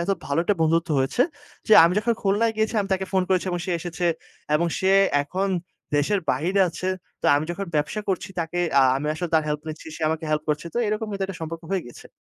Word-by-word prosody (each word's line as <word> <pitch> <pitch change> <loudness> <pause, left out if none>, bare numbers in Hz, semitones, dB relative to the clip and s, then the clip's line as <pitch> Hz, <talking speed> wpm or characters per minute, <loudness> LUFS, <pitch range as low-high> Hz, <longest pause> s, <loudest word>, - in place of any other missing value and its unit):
এতো 195 +3 +1
ভালো 140 +2 -1
একটা 205 - +2
বন্ধুত্ব 165 +2 +2
হয়েছে, 135 - +2 0.5
যে, - - +4
আমি 170 - +3
যখন 235 +2 +1
খুলনায় 210 +3 +2
গিয়েছি, 220 +1 0
আমি 195 - -3
তাকে 190 0 -3
ফোন 190 - +3
করেছি, 185 0 +1
এবং 175 -1 -2
সে 185 - -1
এসেছে, 175 0 -3 0.5
এবং 170 +3 +2
সে 190 0 +2 0.3
এখন 190 +7 -2 0.5
দেশের 190 +7 +1
বাহিরে 185 +5 +1
আছে। 175 +2 -5 0.3
তো - - -1
আমি 145 - 0
যখন 195 +3 -4
ব্যবসা 150 +8 -1
করছি 190 +1 -1
তাকে 165 +2 -3 0.2
আ - - +6
আমি 150 +2 -3
আসলে 175 +2 -3
তার 160 - +4
হেল্প 150 0 -2
নিচ্ছি, 155 +1 -8
সে 160 - -8
আমাকে 160 0 -2
হেল্প 150 0 0
করছে। 150 +2 -1
তো - - 0
এরকম 215 +1 -1
কিন্তু 195 -1 -2
একটা 195 -2 -7
সম্পর্ক 165 +1 -5
হয়ে 190 -3 0
গিয়েছে। 120 - -13
175 Hz, 225 wpm, -24 LUFS, 160-195 Hz, 0.5 s, আ